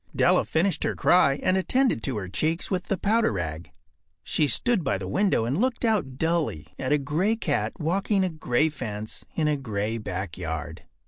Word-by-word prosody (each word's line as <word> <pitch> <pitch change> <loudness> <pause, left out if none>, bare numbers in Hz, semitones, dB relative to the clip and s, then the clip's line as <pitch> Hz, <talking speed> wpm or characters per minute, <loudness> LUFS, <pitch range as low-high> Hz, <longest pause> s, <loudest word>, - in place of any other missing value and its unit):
Della - - +3
finished 175 +4 0
her - - 0
cry 140 -6 +4
and 185 - +3
attended 250 - +1
to 125 0 -1
her 95 -3 -4
cheeks 155 - -1
with 185 -1 -1
the 195 - -1
powder 225 +5 +2
rag. 85 -4 -4 0.5
She 150 - +1
stood 215 - +3
by 100 - 0
the 95 -1 -6
window 190 - +1
and 135 - 0
looked 255 -1 0
out 195 - 0
dully 160 - -1
at 130 - -2
a 150 - +5
gray 155 +10 0
cat 225 - -1
walking 190 +5 +1
a 185 - +1
gray 155 -2 +1
fence 110 -7 -6
in 155 -2 +1
a 150 -1 +1
gray 110 -3 -3
backyard. 85 -5 -5
150 Hz, 185 wpm, -26 LUFS, -, 0.5 s, a